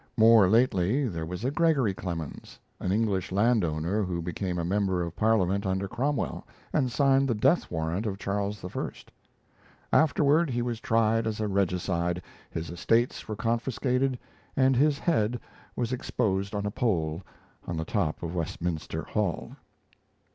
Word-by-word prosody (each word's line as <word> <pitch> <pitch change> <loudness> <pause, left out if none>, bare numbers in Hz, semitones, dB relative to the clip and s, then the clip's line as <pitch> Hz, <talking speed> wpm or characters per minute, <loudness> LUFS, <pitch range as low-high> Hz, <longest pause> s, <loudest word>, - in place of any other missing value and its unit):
More 110 -4 +7
lately 115 +3 +3
there 80 -6 -4
was 90 +6 -5
a 130 - +1
Gregory 145 - +2
Clemens, 85 -5 -6 0.2
an 90 - -1
English 100 -3 0
landowner 100 -3 +1
who 90 -3 -2
became 90 +2 -3
a 85 - -1
member 95 -1 +1
of 85 0 -5
Parliament 100 -3 +2
under 95 0 -1
Cromwell 130 +6 -2 0.3
and 130 -5 +1
signed 135 0 +3
the 120 - +1
death 135 +11 +2
warrant 85 +6 -2
of 100 -2 -3
Charles 100 0 -3
I. 90 - -3 1.0
Afterward 155 +1 +4
he 120 -1 -1
was 120 -2 -3
tried 115 0 +2
as 110 -1 -3
a 110 - 0
regicide, 90 -2 0 0.3
his 80 0 -5
estates 115 +8 +1
were 110 - -3
confiscated, 125 +4 0 0.4
and 130 0 +4
his 145 +3 +3
head 125 -8 +1 0.4
was 120 0 -1
exposed 100 -5 -1
on 100 0 -2
a 105 - -1
pole 85 -8 0 0.5
on 85 - -3
the 80 - -2
top 80 -6 -1
of 85 0 -3
Westminster 85 -1 -3
Hall. - - -2
105 Hz, 150 wpm, -28 LUFS, 90-120 Hz, 1.0 s, More